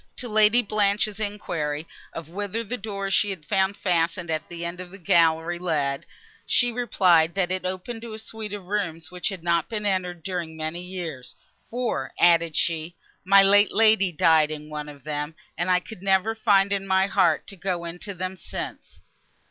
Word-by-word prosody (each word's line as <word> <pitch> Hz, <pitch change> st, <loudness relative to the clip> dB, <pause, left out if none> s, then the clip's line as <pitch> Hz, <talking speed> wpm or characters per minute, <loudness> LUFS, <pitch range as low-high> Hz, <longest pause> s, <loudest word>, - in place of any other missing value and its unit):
To 250 Hz, -, -5 dB
Lady 215 Hz, +2 st, +4 dB
Blanche's 205 Hz, 0 st, 0 dB
enquiry 165 Hz, -8 st, -3 dB, 0.2 s
of 165 Hz, -2 st, -7 dB
whither 205 Hz, +5 st, -4 dB
the 230 Hz, +3 st, -4 dB
door 200 Hz, -3 st, -4 dB
she 205 Hz, +1 st, +3 dB
had 180 Hz, -6 st, -6 dB
found 195 Hz, +2 st, +1 dB
fastened 170 Hz, -1 st, 0 dB
at 155 Hz, 0 st, -3 dB
the 170 Hz, 0 st, -5 dB
end 170 Hz, +1 st, -5 dB
of 185 Hz, -1 st, -8 dB
the 195 Hz, -, -12 dB
gallery 165 Hz, -1 st, +2 dB
led, 145 Hz, -6 st, -1 dB, 0.4 s
she 245 Hz, -1 st, +3 dB
replied, 180 Hz, -9 st, +3 dB
that 185 Hz, -2 st, +1 dB
it 185 Hz, -1 st, -2 dB
opened 185 Hz, +6 st, -4 dB
to 230 Hz, -1 st, -8 dB
a -, -, -6 dB
suite 220 Hz, -1 st, -5 dB
of 200 Hz, -3 st, -9 dB
rooms, 180 Hz, -5 st, -3 dB
which 180 Hz, +2 st, -3 dB
had 190 Hz, -5 st, -7 dB
not 170 Hz, -1 st, +1 dB
been 210 Hz, -2 st, -3 dB
entered, 180 Hz, -4 st, -1 dB
during 170 Hz, -4 st, -4 dB
many 160 Hz, +2 st, -4 dB
years, 175 Hz, -8 st, -7 dB, 0.3 s
"For," 235 Hz, -, -2 dB
added 170 Hz, -2 st, +4 dB
she, 165 Hz, 0 st, -1 dB, 0.3 s
"my 195 Hz, +1 st, +7 dB
late 205 Hz, +1 st, +5 dB
lady 215 Hz, -4 st, +5 dB
died 160 Hz, -1 st, +4 dB
in 150 Hz, 0 st, -7 dB
one 150 Hz, 0 st, -5 dB
of 145 Hz, -2 st, -13 dB
them, 150 Hz, +1 st, -4 dB, 0.2 s
and 175 Hz, +2 st, -2 dB
I 180 Hz, 0 st, +4 dB
could 180 Hz, +1 st, -11 dB
never 195 Hz, +3 st, +2 dB
find 200 Hz, -2 st, +3 dB
in 195 Hz, -1 st, -2 dB
my 190 Hz, 0 st, +3 dB
heart 180 Hz, -6 st, +2 dB
to 200 Hz, -, -11 dB
go 180 Hz, -2 st, -3 dB
into 175 Hz, +4 st, -6 dB
them 185 Hz, +1 st, -4 dB
since." -, -, -7 dB
185 Hz, 190 wpm, -25 LUFS, 165-205 Hz, 0.4 s, my